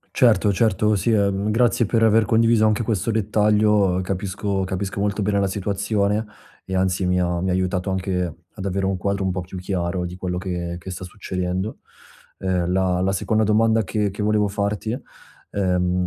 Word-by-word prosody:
Certo, 110 -5 +4
certo, 105 0 +2
sì, 105 +4 0
uhm, 100 0 +1
grazie 115 0 +2
per 115 +1 +1
aver 110 -1 +4
condiviso 115 -1 +4
anche 110 +2 +2
questo 110 0 -1
dettaglio, 105 -3 +2
capisco 95 +1 -2
capisco 95 +1 -3
molto 105 +1 0
bene 100 0 +1
la 100 - +2
situazione 100 +2 -1 0.4
e, 95 - -2
anzi, 95 0 +1
mi 90 0 +2
ha 90 -1 0
mi 95 - -1
ha - - +1
aiutato 95 +1 -1
anche 95 -1 -1 0.3
ad 95 - -7
avere 95 0 -1
un 95 -1 0
quadro 100 +1 -1
un 95 - +1
po' 90 - -2
più 90 +1 -9
chiaro 90 -1 -2
di 90 +1 -6
quello 90 -1 -3
che 90 -2 -3
che 95 +2 -9
sta 90 0 -6
succedendo. 90 +1 -4 0.6
Uhm, 90 -2 0
la 90 -1 +1
la 95 +1 +1
seconda 110 +3 +1
domanda 110 +1 +3
che 105 0 -1
che 100 +2 -5
volevo 105 -1 +2
farti, 100 +2 -2 0.6
ehm, 90 -2 0
100 Hz, 185 wpm, -22 LUFS, 90-105 Hz, 0.6 s, Certo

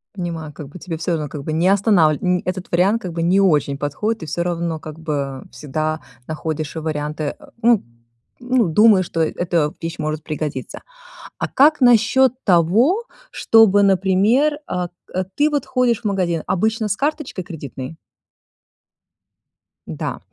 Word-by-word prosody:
Понимаю, 165 -5 -5
как 145 -1 -9
бы 180 - -11
тебе 165 -1 -5
всё 170 +2 -3
равно 155 -3 -1
как 145 -1 -7
бы 155 - -3
не 165 +3 +2
останавли 195 -7 +3
нь 180 -1 +1
этот 185 0 -4
вариант 195 +6 +2
как 180 -2 -5
бы 165 - -3
не 180 +4 +3
очень 150 -7 +2
подходит 180 +9 -2
и - - -5
всё 165 +3 -2
равно, 170 -2 -2
как 155 +1 -10
бы, 160 -2 -3 0.3
а, - - -11
всегда 155 +4 -3 0.3
находишь 155 0 -4
варианты. 150 -1 -3
А, - - -16
ну 230 -2 +4 0.6
ну 245 -5 +1
думаешь 205 +2 +5
что, 165 - -5
э, 160 - 0
эта 165 -4 0
вещь 165 0 -5
может 155 0 -3
пригодиться. 150 -4 -5 0.6
А - - -1
как 295 +3 +4
насчёт 245 +1 +5
того, 210 - +3 0.3
чтобы, 220 -3 +5
например, 200 +10 +3
а, 180 -1 -3 0.3
э, 185 - +1
ты, 295 +1 +3
вот, 290 -3 -1
ходишь 250 -3 +1
в - - -20
магазин 180 -5 0
обычно 220 +3 0
с 205 - -1
карточкой 290 - -3
кредитной? 145 -4 -8 1.9
Да. - - -4
175 Hz, 160 wpm, -20 LUFS, 155-220 Hz, 1.9 s, думаешь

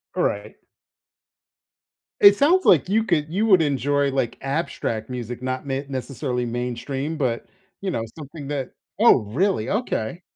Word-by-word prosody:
All - - +1
right. - - -2 1.6
It 405 - +9
sounds 350 +7 +3
like 175 +1 +5
you 220 +2 +3
could 160 -8 0
you 205 +5 +1
would 190 -6 +6
enjoy, 145 0 +1
like, 130 -3 -1
abstract 135 -6 -2
music, 125 -1 -5
not 130 +2 -3
ma 135 0 -1
necessarily 130 -1 -3
mainstream, 125 +5 -3
but, 125 -6 -1 0.4
you 195 - -2
know, 115 - -2
something 145 -1 -9
that 140 -3 -4 0.3
Oh, 220 - +6
really? 140 - 0
Okay. 180 - -2
140 Hz, 145 wpm, -23 LUFS, 125-175 Hz, 1.6 s, It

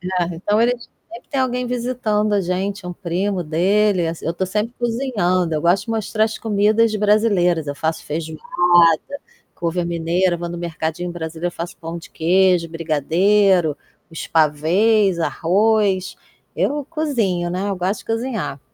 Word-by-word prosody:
É, 180 -1 -1
então 205 +6 0
eles 240 0 0 0.2
sempre 235 - -11
tem 275 -2 -1
alguém 250 -1 -1
visitando 235 -4 -1
a 200 - +3
gente, 190 +2 -3
um 180 - -4
primo 180 +2 -2
dele, 185 +3 +2
ass 165 0 -5
eu 165 - -1
tô 190 - -1
sempre 215 +5 -2
cozinhando, 210 -9 0
eu 150 - 0
gosto 180 +4 +2
de 230 - -6
mostrar 220 0 0
as 220 - -3
comidas 215 +1 +2
brasileiras. 200 -6 +2
Eu 145 - -3
faço 160 +2 -3
feijoada, 155 +1 -5 1.1
couve 170 +1 -2
à - - -1
mineira, 175 +2 0
vou 170 0 -5
no 175 - -6
mercadinho 170 +1 -3
brasileiro, 170 +1 -5
faço 175 +4 -6
pão 165 0 -6
de 165 - -13
queijo, 180 0 +2
brigadeiro, 165 +2 +2 0.3
os 165 - -6
pavês, 170 +6 +2
arroz. 195 +3 +1 0.4
Eu 290 -1 0
cozinho, 230 - -1
né, 185 +3 -2
eu 195 - -2
gosto 185 +4 -1
de - - -19
cozinhar. 225 - -3
185 Hz, 155 wpm, -20 LUFS, 170-215 Hz, 1.1 s, a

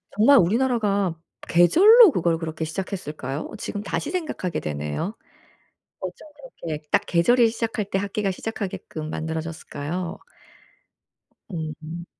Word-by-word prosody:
정말 255 +7 +6
우리나라가 205 -3 +2 0.3
계절로 385 - +7
그걸 170 - +1
그렇게 160 -1 -4
시작했을까요? 155 -5 -5
지금 205 0 -5
다시 290 +8 -3
생각하게 310 - -2
되네요. 75 - -3 0.9
어쩜 - - -7 0.3
그렇게 155 -2 -4
딱 - - +3
계절이 230 +8 +4
시작할 225 -2 -2
때 195 - -1
학기가 200 0 -1
시작하게끔 185 -6 -5
만들어 160 +1 -3
졌을까요? 165 +1 -5 1.3
음. 160 0 -6
180 Hz, 300 characters per minute, -24 LUFS, 160-220 Hz, 1.3 s, 계절로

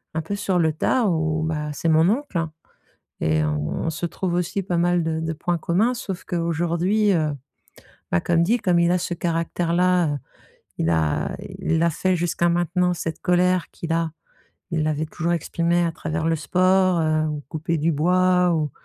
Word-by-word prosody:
un 160 - 0
peu 200 +6 -4
sur 195 -3 0
le 160 -1 +3
tas 240 +9 +1
ou 160 -2 0
bah 150 -2 -2
c'est 165 +3 -1
mon 160 +3 +4
oncle 210 - -1 0.7
et 80 0 +2
on 75 - -2
se 165 +2 -3
trouve 175 +1 -3
aussi 180 +3 -1
pas 175 -2 -1
mal 175 0 +2
de 160 0 -1
de 160 0 -2
points 175 +2 -1
communs 195 +10 +1
sauf 190 -5 -5
qu'aujourd'hui, 175 +5 +1
heu, 155 -3 +1 0.8
bah 85 - +3
comme 170 -1 +2
dit 235 +6 +2
comme 180 -4 +2
il 170 0 +3
a 180 - +2
ce 175 - -3
caractère 170 0 -1
là, 180 -3 +3
heu, - - -3 0.6
il 80 - +1
a 80 -2 0 0.2
il 165 0 0
a 170 - +3
fait 185 +4 0
jusqu'à 175 0 0
maintenant 175 +1 +1
cette 165 -1 -5
colère 180 0 +2
qu'il 165 -1 -5
a, 165 -1 0 0.6
il 160 -2 0
l'avait 155 0 -1
toujours 170 +2 -2
exprimé 170 +1 0
à 165 - 0
travers 155 0 -3
le 165 - +2
sport, 185 +2 +2
heu, 155 0 +1
ou 150 -1 -4
couper 165 +1 -2
du 160 +3 +1
bois 180 +2 +3
ou 150 -3 -1
170 Hz, 190 wpm, -23 LUFS, 160-180 Hz, 0.8 s, mon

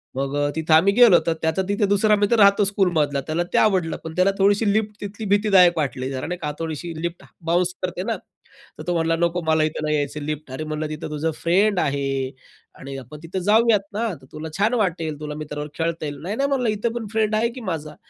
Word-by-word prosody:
मग 135 +1 -2
अ, - - 0
तिथे 160 0 +1
आम्ही 180 +6 +5
गेलो, 230 -5 +7
तर 165 - +3
त्याचा 160 +3 +1
तिथे 205 +1 +1
दुसरा 205 +2 +3
मित्र 205 +3 +2
राहतो 200 0 +6
स्कूलमधला. 170 -8 +1
त्याला 160 +2 0
ते - - +3
आवडलं. 185 -6 +2
पण 160 - -6
त्याला 185 +2 +3
थोडीशी 200 +2 +3
लिफ्ट 210 -1 -1
तिथली 205 +2 -6
भीतीदायक 190 -5 +5
वाटली 130 -3 -2
जरा, 130 +1 -4
नाही 180 +1 -3
का. 150 - -2
थोडीशी 165 +1 -4
लिफ्ट 170 0 -4 0.2
बाउन्स 175 +2 +1
करते 180 0 -2
ना, 225 +2 -1 0.6
तर - - -7
तो 175 - +1
म्हणला 165 0 +1
"नको, 170 +1 +1
मला 160 0 +3
इथं 155 0 -2
नाही 150 0 +1
यायचं, 145 +1 -2
लिफ्ट 150 -1 -5
अरे 130 +4 -4
म्हणलं, 155 0 -3
"तिथं 155 0 -6
तुझं 155 +2 -2
फ्रेंड 190 +3 +3
आहे 140 -3 0 0.7
आणि 135 0 -7
आपण 135 +3 -10
तिथं 175 +3 -4
जाऊयात 215 +2 +4
ना, 225 +3 -1
तर - - -16
तुला 155 +1 -7
छान 210 +4 +2
वाटेल. 165 -9 -1
तुला 150 -1 -5
मित्राबरोबर 150 -1 -6
खेळता 165 -1 -2
येईल." 145 -1 -5
"नाही, 195 +6 -4
नाही," 275 +3 0
म्हणलं, 255 -4 +1
"इथं 215 +2 -1
पण 230 -2 -4
फ्रेंड 220 -1 +1
आहे 225 +2 +2
की 255 - -8
माझा!" 155 -2 -5
170 Hz, 220 wpm, -22 LUFS, 155-205 Hz, 0.7 s, गेलो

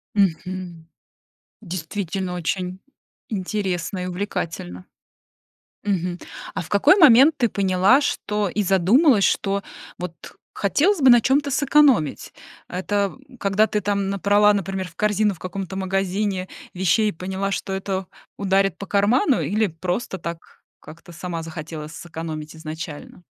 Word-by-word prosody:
Мгм. 180 -3 -1 0.7
Действительно, 185 0 -4
очень 180 +1 -3 0.5
интересно 190 -3 -2
и - - -4
увлекательно. 165 - -4 1.0
Мгм. 180 -3 -1 0.4
А - - -2
в 160 - -11
какой 275 - +5
момент 290 0 +7
ты 240 -4 +2
поняла, 195 +6 +3
что 210 -7 -1
и 210 +3 -1
задумалась, 200 - +4
что, 200 0 +1 0.4
вот 180 -1 -8 0.2
хотелось 315 - +1
бы 265 - +6
на 240 -1 +8
чём-то 280 +4 +1
сэкономить? 275 - +3 0.4
Это 200 +2 -1 0.2
когда 200 +1 +2
ты 210 - 0
там 200 -1 -1
набрала, 205 +1 +4
например, 195 -1 -3
в 170 - -20
корзину 210 0 +1
в - - -17
каком-то 190 +2 -5
магазине 190 0 -1 0.3
вещей 190 +4 +2
и - - -9
поняла, 190 +3 -3
что 195 - -3
это 190 -1 -3 0.3
ударит 195 -2 +1
по 200 - -7
карману, 225 +7 +2
или 215 0 +1
просто 180 +4 -3
так, 170 0 -5 0.4
как-то 170 +3 -13
сама 170 0 -5
захотела 155 -1 -7
сэкономить 160 -1 -7
изначально? 160 +1 -8
195 Hz, 130 wpm, -22 LUFS, 175-210 Hz, 1.0 s, на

